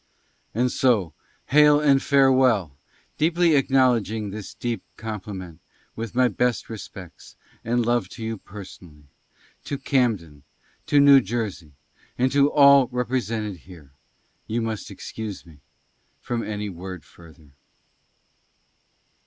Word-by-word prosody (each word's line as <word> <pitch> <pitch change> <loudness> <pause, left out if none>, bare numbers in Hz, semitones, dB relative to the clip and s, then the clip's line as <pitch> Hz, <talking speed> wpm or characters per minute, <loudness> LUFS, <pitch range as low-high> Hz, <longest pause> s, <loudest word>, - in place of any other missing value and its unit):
AND 125 +2 +1
SO, 105 - +1 0.4
HAIL 150 0 +6
AND 140 -2 +3
FAREWELL. 130 - +3 0.4
DEEPLY 170 +1 +3
ACKNOWLEDGING 125 -7 +2
THIS 105 -1 -8
DEEP 120 -1 -3 0.2
COMPLIMENT, 95 -6 -7 0.4
WITH 115 0 -6
MY 130 0 +4
BEST 120 +2 -1
RESPECTS 95 -5 -11 0.3
AND 120 +1 0
LOVE 120 +1 0
TO 115 - -9
YOU 110 -1 -4
PERSONALLY 90 -7 -12 0.4
— - - -33
TO 140 - -4
CAMDEN 115 - -1 0.2
— - - -37
TO 145 -2 +4
NEW 140 -1 +8
JERSEY, 100 - -4 0.4
AND 130 +1 +1
TO 140 +1 +3
ALL 140 -3 +6
REPRE 125 +1 -1
SENTED 105 -3 -4
HERE 80 -5 -15 0.3
— - - -43
YOU 115 +1 -2
MUST 110 -2 -4
EXCUSE 110 -4 -7
ME 80 -4 -17 0.6
FROM 120 -1 -3
ANY 105 -1 -4
WORD 90 -2 -8
FURTHER. 80 -3 -18
115 Hz, 130 wpm, -23 LUFS, 95-130 Hz, 0.6 s, NEW